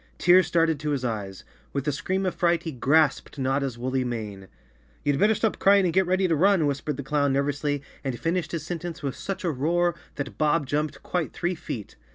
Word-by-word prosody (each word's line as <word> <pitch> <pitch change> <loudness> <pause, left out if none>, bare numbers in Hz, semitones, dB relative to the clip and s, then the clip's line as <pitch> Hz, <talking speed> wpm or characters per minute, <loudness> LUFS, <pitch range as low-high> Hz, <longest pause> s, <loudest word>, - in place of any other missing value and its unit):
Tears 180 +1 +5
started 165 -3 +2
to 150 0 -3
his 140 -3 -1
eyes. 100 -5 -4 0.3
With 140 +1 -2
a - - +3
scream 190 +7 -1
of 185 - 0
fright, 170 -1 +1
he 160 - -4
grasped 145 +3 +2
Notta's 135 -1 -1
woolly 130 +2 -1
mane. 105 -6 -5 0.6
"You'd 145 -1 +1
better 215 +1 +4
stop 220 0 0
crying 200 -1 +5
and 170 - 0
get 190 -1 +3
ready 185 +1 +2
to 165 - +2
run," 185 0 +4
whispered 145 0 -2
the 140 - -4
clown 145 0 +1
nervously 145 +1 -1 0.2
and 130 -4 -3
finished 170 +1 -1
his 165 -3 -3
sen¬ 170 +1 -4
tence 170 -3 -6
with 135 -2 -2
such 195 -1 -5
a 170 - +1
roar 170 +5 +1 0.2
that 135 -8 -6
Bob 150 0 +2
jumped 150 +3 -2
quite 175 -3 -2
three 175 +1 -1
feet. 115 - -7
150 Hz, 210 wpm, -26 LUFS, 135-175 Hz, 0.6 s, Tears